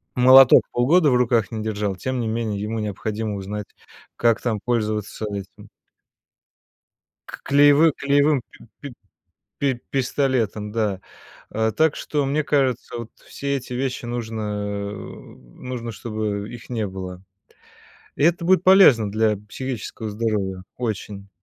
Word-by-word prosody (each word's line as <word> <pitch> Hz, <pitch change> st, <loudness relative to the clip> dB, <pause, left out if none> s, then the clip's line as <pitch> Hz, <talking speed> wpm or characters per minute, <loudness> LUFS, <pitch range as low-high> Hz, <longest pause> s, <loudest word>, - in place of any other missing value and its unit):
молоток 130 Hz, +1 st, +8 dB
полгода 150 Hz, +6 st, +3 dB
в 125 Hz, -, +3 dB
руках 120 Hz, -4 st, +2 dB
не 110 Hz, -1 st, -4 dB
держал, 105 Hz, -3 st, -2 dB
тем 130 Hz, +6 st, -3 dB
не 115 Hz, -, -2 dB
менее 110 Hz, -2 st, -2 dB
ему 110 Hz, +2 st, -3 dB
необходимо 105 Hz, +1 st, -3 dB
узнать, 100 Hz, +1 st, -5 dB, 0.5 s
как 115 Hz, -1 st, +2 dB
там 110 Hz, -4 st, -1 dB
пользоваться 110 Hz, -3 st, -2 dB
этим 100 Hz, -2 st, -8 dB, 1.6 s
к -, -, -9 dB
клеевым 145 Hz, +3 st, +5 dB
клеевым 140 Hz, 0 st, +2 dB
пи -, -, -18 dB, 0.2 s
пи 140 Hz, -3 st, -8 dB, 0.7 s
пи 140 Hz, -2 st, +1 dB, 0.2 s
пистолетом, 125 Hz, -6 st, -1 dB
да. 105 Hz, -4 st, -1 dB, 0.5 s
Э, 110 Hz, 0 st, 0 dB
так 160 Hz, -1 st, +3 dB
что, 145 Hz, -2 st, -2 dB
мне 145 Hz, +3 st, 0 dB
кажется, 135 Hz, -5 st, 0 dB
вот 115 Hz, -1 st, -7 dB, 0.2 s
все 140 Hz, 0 st, -3 dB
эти 125 Hz, -1 st, -7 dB
вещи 125 Hz, -1 st, -3 dB
нужно, 115 Hz, -2 st, -4 dB, 0.5 s
э, -, -, -6 dB
нужно, 115 Hz, -, -9 dB
чтобы 105 Hz, -2 st, -4 dB
их 120 Hz, +1 st, -11 dB
не 110 Hz, -3 st, -1 dB
было. 95 Hz, -1 st, -7 dB, 0.9 s
И -, -, -2 dB
это 170 Hz, +1 st, +2 dB
будет 185 Hz, 0 st, +4 dB
полезно 145 Hz, -, +6 dB
для 110 Hz, 0 st, +1 dB
психического 115 Hz, -3 st, -5 dB
здоровья 105 Hz, -4 st, -2 dB
очень. 105 Hz, -4 st, -5 dB
115 Hz, 135 wpm, -22 LUFS, 105-135 Hz, 1.6 s, молоток